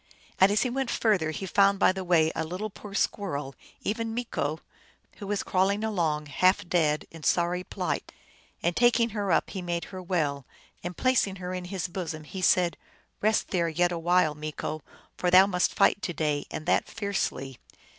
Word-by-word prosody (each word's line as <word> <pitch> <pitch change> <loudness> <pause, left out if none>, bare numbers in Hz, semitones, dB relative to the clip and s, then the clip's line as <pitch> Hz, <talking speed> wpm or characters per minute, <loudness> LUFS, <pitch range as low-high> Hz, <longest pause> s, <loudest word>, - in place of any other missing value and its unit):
And 190 +1 +6
as 210 - +3
he 255 - 0
went 265 -1 -1
further 200 -8 +1
he 160 +5 -4
found 200 +1 +4
by 190 - +5
the 190 0 -5
way 165 -3 +3
a - - -3
poor - - -4
little 195 +4 -6
squirrel, 145 -12 -1 0.3
even 225 +1 -2
Meeko, 160 -10 -2 0.6
who 200 - -7
was 205 0 -1
crawling 195 +3 +1
along, 165 -8 0
half 185 +6 +2
dead, 155 -4 +1
in 165 - -11
sorry 175 +3 +1
plight. - - -3 0.5
And 170 0 +1
taking 240 -1 +4
her 205 -3 -2
up - - +2
he 190 - -4
made 175 -1 -2
her 185 - -5
well, 155 -7 -1 0.4
and 175 -1 -5
placing 255 -7 +2
her 180 -1 -5
in 180 -1 -4
his 185 -1 -3
bosom, 170 -4 -5
said, 180 -1 +2 0.2
" - - -42
Eest 215 +1 +2
there 170 -3 +1
yet 175 +2 +1
a 170 - -2
while, 175 -2 +3
Meeko, 155 +1 -5 0.4
for 180 - +1
thou 185 +2 +8
must 180 -2 +1
fight 205 - +3
to 175 - -3
day, 150 -3 -1
and 155 - -6
that 180 - +1
fiercely. 195 - -3
180 Hz, 185 wpm, -27 LUFS, 160-200 Hz, 0.6 s, thou